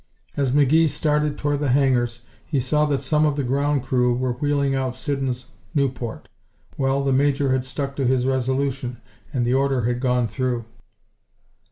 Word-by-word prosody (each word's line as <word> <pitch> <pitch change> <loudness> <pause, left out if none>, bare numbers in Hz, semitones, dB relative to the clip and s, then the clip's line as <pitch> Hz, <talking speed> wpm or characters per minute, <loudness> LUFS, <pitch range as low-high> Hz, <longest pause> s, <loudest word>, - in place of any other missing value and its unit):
As 135 -3 +1
McGee 150 +4 +4
started 150 0 0
toward 145 -1 -1
the 145 -2 0
hangars 125 -3 +2 0.2
he 145 - -1
saw 150 +4 +2
that 145 -2 0
some 150 -1 +2
of 150 -2 +2
the 145 - -1
ground 140 +1 0
crew 125 -2 +2
were 125 0 -1
wheeling 140 +1 0
out 130 -2 -1
Siddons' 130 -3 -3 0.2
Nieuport. 130 -5 -2 0.5
Well, 135 -1 +1
the 135 -1 +1
Major 140 0 +2
had 130 -1 +1
stuck 135 +2 -4
to 135 -3 +1
his 130 -1 +2
resolution 130 -1 -1 0.3
and 125 -5 0
the 120 - +1
order 135 -2 +1
had 120 +1 0
gone 125 -2 +1
through. 120 +2 -2
135 Hz, 170 wpm, -23 LUFS, 125-145 Hz, 0.5 s, McGee